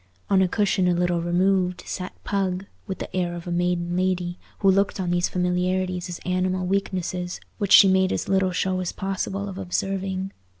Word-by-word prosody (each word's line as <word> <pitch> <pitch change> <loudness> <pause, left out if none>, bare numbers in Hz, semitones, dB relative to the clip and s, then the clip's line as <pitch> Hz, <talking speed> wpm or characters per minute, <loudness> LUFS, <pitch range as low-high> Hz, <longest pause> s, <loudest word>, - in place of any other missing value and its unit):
On 190 -1 +5
a 190 - +4
cushion 195 -1 +1
a 175 - +3
little 175 -1 +1
removed 180 +1 +1
sat 185 -1 -5
Pug, 195 -2 -1 0.2
with 190 - -4
the - - -7
air 175 -1 0
of 170 - -8
a 175 - -4
maiden 175 0 0
lady, 180 -1 -1 0.2
who 195 -1 +4
looked 195 +1 +1
on 180 -2 -1
these 175 0 +1
familiarities 180 0 0
as 175 - -4
animal 185 0 0
weaknesses, 180 -2 -2 0.2
which 200 -3 -1
she 195 - +10
made 190 0 +3
as - - -2
little 190 -1 +2
show 185 +1 0
as 180 -2 -2
possible 195 +1 -3
of 195 -1 -6
observing. 190 +1 -2
185 Hz, 185 wpm, -24 LUFS, 180-190 Hz, 0.2 s, she